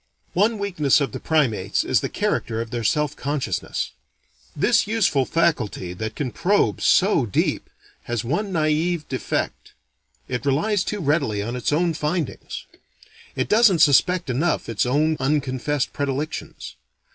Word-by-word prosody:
One 215 +5 +2
weakness 175 -10 +2
of 140 -5 -1
the - - -6
primates 125 -12 +1
is - - +2
the - - -3
character 110 0 -1
of 115 -1 -4
their 120 -1 -3
self 150 +5 +1
consciousness. 145 -1 -3 0.6
This - - +2
useful 200 -11 +2
faculty, 120 - 0
that 110 +3 -5
can 135 -4 -3
probe 200 - +1
so 180 - +3
deep, 100 - -1 0.4
has 120 -2 -2
one 195 - -2
naive 160 0 0
defect 130 - -3 0.5
it 125 -2 -3
relies 180 +9 +1
too 210 0 -3
readily 140 -9 0
on 120 +3 -4
its 125 - -1
own 165 +3 +2
findings. 155 +2 -3 0.7
It - - -1
doesn't 215 -4 +5
suspect 165 +1 +4
enough 160 +8 0
its 115 +2 0
own 155 +4 +2
unconfessed 140 0 -1
predilections. 145 +2 -4
150 Hz, 140 wpm, -23 LUFS, 125-170 Hz, 0.7 s, doesn't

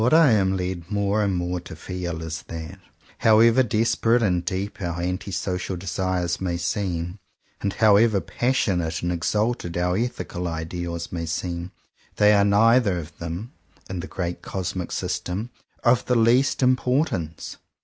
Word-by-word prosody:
What 125 +7 +4
I 160 -5 +7
am 95 -3 +2
led 90 -1 -4
more 100 0 +1
and 100 -2 +1
more 90 0 -1
to 85 -2 -10
feel 85 -1 -5
is 80 0 -5
that, 85 +3 -7 0.4
however 115 +3 +6
desperate 115 0 +2
and 90 -4 +1
deep 95 +3 -3
our 85 -1 -3
anti 90 +3 -3
social 90 0 -2
desires 90 -1 -2
may 90 -2 -1
seem, 90 +1 -2 0.4
and 100 -1 -1
however 110 -1 +5
passionate 95 -11 0
and 85 - 0
exalted 105 +1 -1
our 90 +1 +1
ethical 100 -5 -3
ideals 85 +1 -4
may 85 -2 -3
seem, 85 +2 -3 0.4
they 105 0 +5
are 100 -1 +5
neither 105 0 +4
of 85 -1 -7
them, 85 +8 -5 0.4
in 95 - -3
the 90 - -5
great 90 -2 -4
cosmic 95 -1 -4
system, 100 +7 -3 0.3
of 120 0 +4
the 125 - +1
least 120 +4 +3
importance. 125 - 0
95 Hz, 150 wpm, -24 LUFS, 85-110 Hz, 0.4 s, I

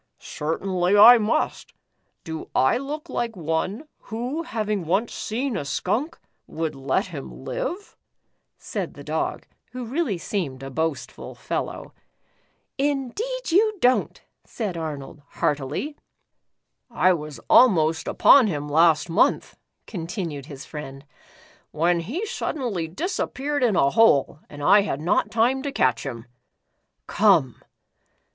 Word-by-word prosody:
" - - -54 0.2
Certainly, 180 +5 0
I 235 +4 +10
must. 215 +1 -1 0.5
Do 160 -1 -7
I 130 - +3
look 300 +4 -6
like 235 -6 -3
one, 175 - -2 0.2
who 245 +8 -3
having 215 - -3
once 200 +7 0
seen 245 +3 -3
a - - -2
skunk, 225 - -2 0.3
would 160 -1 -3
let 135 0 -1
him 65 0 -9
live?" 405 +4 -4 0.6
said - - -5
the - - -10
Dog, - - -3 0.3
who 250 -1 -5
really 250 - -1
seemed 155 -8 -4
a 135 - -7
boastful 160 +1 -4
fellow. - - -5 0.4
" - - -43 0.2
Indeed 445 - -4
you 425 +4 +3
don't," 255 -2 +2 0.2
said 210 -7 -4
Arnold, 150 -3 -6
heartily. 150 - -2 0.9
"I 185 -6 +3
was 150 -3 -6
almost 165 -10 +4
upon 265 -5 +6
him 150 -6 -3
last 160 +1 +4
month," 165 - +1 0.3
contin 175 -1 -4
ued 140 -2 -8
his 140 -3 -9
friend, 140 -2 -8 0.6
"when 170 +3 +1
he 260 - -4
suddenly 235 - -3
disappeared 290 - -3
in 225 -5 +3
a 140 -5 +3
hole 150 -9 +4
and 145 -1 -9
I 205 +7 +6
had 195 -8 -3
not 165 +4 +1
time 240 +4 +2
to 285 0 -3
catch 130 - +1
him. 115 -3 -6 0.8
Come." - - +3
185 Hz, 130 wpm, -24 LUFS, 150-250 Hz, 0.9 s, I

